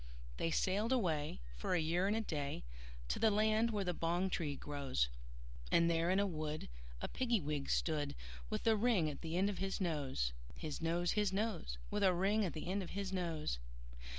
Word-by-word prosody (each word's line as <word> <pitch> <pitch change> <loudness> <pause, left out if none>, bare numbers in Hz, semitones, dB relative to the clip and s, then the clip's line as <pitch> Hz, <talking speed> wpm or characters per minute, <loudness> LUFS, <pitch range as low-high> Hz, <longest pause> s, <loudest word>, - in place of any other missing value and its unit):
They - - 0
sailed 200 +7 +1
away, 160 - +1
for 60 - 0
a - - +3
year 170 +4 +2
and 205 - +2
a 225 - +1
day, 145 - -3 0.5
To - - 0
the 225 - +5
land 215 +2 +3
where 210 -3 0
the 180 -1 0
bong 175 +3 0
tree 150 -5 -1
grows; 135 - -1 0.6
And 170 0 +5
there 165 +1 +2
in 190 +2 +4
a 200 - +4
wood 155 - -3 0.3
a - - -1
Piggy 240 -3 +1
wig 150 -3 -2
stood, 150 -3 +1 0.3
With - - -2
a 225 -1 +6
ring 210 -8 +3
at 140 - -9
the 165 +1 -2
end 195 +2 +4
of 205 -2 -2
his 195 0 -1
nose, 140 - 0 0.2
His 155 -1 -5
nose, 170 +2 +1
His 210 -2 +2
nose, 195 - -1
With 210 - 0
a 190 -2 +5
ring 200 +4 +3
at 175 - -2
the 155 - -5
end 195 +2 0
of 180 - -6
his 195 -1 -3
nose. 165 - -1
175 Hz, 205 wpm, -37 LUFS, 155-200 Hz, 0.6 s, a